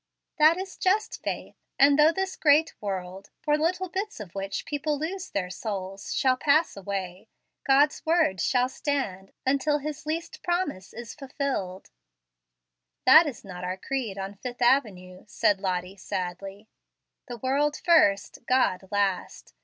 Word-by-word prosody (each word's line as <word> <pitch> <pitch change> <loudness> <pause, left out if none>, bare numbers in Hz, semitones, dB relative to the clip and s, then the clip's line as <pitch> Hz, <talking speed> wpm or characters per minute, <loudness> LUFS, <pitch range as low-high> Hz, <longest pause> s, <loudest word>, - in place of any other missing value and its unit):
"That 310 +3 +6
is 380 0 -6
just 410 +4 0
faith; - - -4 0.2
and 280 +1 +5
though 305 +2 +7
this 380 +2 -3
great 310 +1 +4
world 190 -1 -5
for 295 -1 +3
little 350 +5 0
bits 390 - -4
of 190 -5 -9
which 195 0 -4
people 295 0 -2
lose 355 +5 -4
their 180 -2 -3
souls 195 -1 -5
shall 260 -1 +3
pass 310 +4 +2
away, 195 0 -5 0.4
God's 280 +2 +3
word 320 - +2
shall 250 -1 +2
stand 260 -9 -3
until 280 +3 +2
His 300 +1 -6
least 330 +2 -4
promise 345 - -2
is 235 0 -8
fulfilled." 270 -10 -4 1.1
"That 315 +5 +8
is 255 -7 -7
not 180 -2 -8
our 185 +1 -3
creed 235 -3 -3
on 195 +1 -5
Fifth 245 +4 -5
Avenue," 195 -8 +1
said 205 -1 +1
Lottie 185 0 -2
sadly. 195 +3 -5 0.6
"The 245 -2 -6
world 285 +5 0
first, 200 - +3
God 225 -7 +2
last. 200 -2 -2
255 Hz, 145 wpm, -26 LUFS, 195-300 Hz, 1.1 s, That